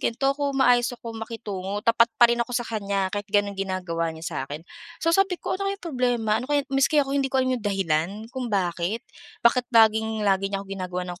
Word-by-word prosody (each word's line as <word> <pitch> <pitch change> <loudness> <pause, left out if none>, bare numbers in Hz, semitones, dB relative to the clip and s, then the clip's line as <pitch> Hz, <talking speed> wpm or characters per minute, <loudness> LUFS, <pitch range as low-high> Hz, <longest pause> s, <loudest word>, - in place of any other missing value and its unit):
gan'to 270 +4 +1
kung 280 -1 -2
maayos 245 -2 +4
ako 230 -1 -8
makitungo 205 -3 -5
tapat 230 0 +5
pa 240 - +7
rin 240 - -1
ako 235 - -1
sa 240 - -1
kanya 200 -3 -2
kahit 205 0 -4
gano'n 205 0 +2
ginagawa 185 -4 -2
niya 160 0 -7
sa - - -4
akin. 150 +3 -7 0.4
So 330 - +3
sabi 390 0 +3
ko, - - -4
"Ano 395 - 0
kayang 395 -1 -5
problema? 245 -7 0
Ano 255 - -7
kaya?" 290 -1 +2
Maski 270 +3 +3
ako 270 - -5
hindi 275 -1 +1
ko 265 -1 +1
alam 255 - +1
'yong 240 -4 -3
dahilan 175 -4 +1 0.2
kung 255 -2 -4
bakit, 185 +2 -1 0.4
bakit 245 +1 +4
laging 220 -2 +3
lagi 195 0 +2
niya 195 0 -3
'ko - - -18
ginagawan 180 -1 -4
ng 175 - -11
220 Hz, 220 wpm, -25 LUFS, 195-255 Hz, 0.4 s, pa